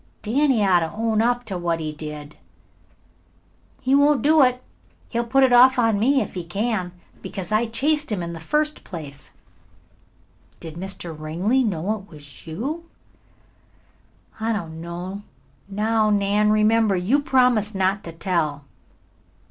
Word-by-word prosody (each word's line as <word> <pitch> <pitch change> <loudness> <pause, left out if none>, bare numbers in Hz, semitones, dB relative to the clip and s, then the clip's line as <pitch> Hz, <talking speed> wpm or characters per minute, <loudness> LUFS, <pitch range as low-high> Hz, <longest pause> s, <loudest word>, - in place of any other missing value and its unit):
"Danny 245 0 +2
ought 185 -2 +4
to 165 -1 -3
own 220 0 0
up 245 +1 +1
that 175 -5 -2
he 155 -1 -3
did 150 -1 -8
it." - - -27 1.4
"He 260 +1 +1
won't 285 -2 +4
do 310 +1 +5
it. 250 -1 +2 0.5
He'll 235 0 -1
put 270 +3 +3
it 255 -2 +4
off 255 +2 +7
on 225 -4 +2
me 265 +5 +3
if - - -10
he 180 - -4
can, 195 +1 -2 0.3
because 190 -1 -6
I 215 +2 +2
chased 295 +5 0
him 190 -4 -2
in 170 0 -5
the 165 - -7
first 300 - -1
place." 150 -5 -9 1.3
"Did 160 -2 -8
Mr. 175 -1 -6
Ringley 175 +12 0
know 200 -1 -1
it 195 - -17
was 145 -1 -13
you?" 290 - -5 1.5
"I 225 +1 -1
don't 165 -6 -4
know. 175 +4 -6 0.5
Now, 215 +2 +1
Nan, 205 +1 +2
remember, 215 -1 +3
you 195 +11 +2
promised 250 -6 +2
not 190 +1 0
to 165 - -6
tell." 160 -4 -2
210 Hz, 150 wpm, -23 LUFS, 170-245 Hz, 1.5 s, off